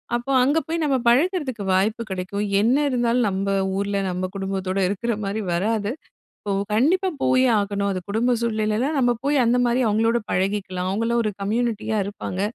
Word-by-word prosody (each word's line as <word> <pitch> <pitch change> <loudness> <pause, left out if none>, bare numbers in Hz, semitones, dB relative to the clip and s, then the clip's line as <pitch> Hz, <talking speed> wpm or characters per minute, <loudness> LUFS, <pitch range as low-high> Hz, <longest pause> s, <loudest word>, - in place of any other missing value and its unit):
அப்போ, 240 +3 -3
அங்க 285 +4 +2
போய் 330 0 -2
நம்ம 285 -3 +2
பழகறதுக்கு 265 - +1
வாய்ப்பு 210 +5 +1
கெடைக்கும். 190 +2 -3 0.2
என்ன 235 +4 +3
இருந்தாலும், 240 -1 +1
நம்ப 195 +1 -2 0.3
ஊர்ல, 200 0 -1
நம்ப 180 +1 -2
குடும்பத்தோட 195 0 -2
இருக்கிற 230 +5 -1
மாரி 205 +3 -2
வராது. 210 +4 0 0.5
இப்போ, 200 -1 -3 0.2
கண்டிப்பா 360 - +2
போயே 255 0 +3
ஆகணும். 200 0 -1
அது 185 - -4
குடும்ப 240 +4 +1
சூழ்நிலையிலலாம், 225 +5 0
நம்ம 245 -1 +3
போய் 285 0 +2
அந்த 245 +2 +3
மாரி 245 +2 +1
அவங்களோட 225 +3 +2
பழகிக்கலாம். 185 -1 -1
அவங்களும் 230 +3 0
ஒரு 215 - -1
கம்யூனிட்டியா 220 0 -1
இருப்பாங்க. 200 -2 -5
220 Hz, 160 wpm, -23 LUFS, 200-245 Hz, 0.5 s, என்ன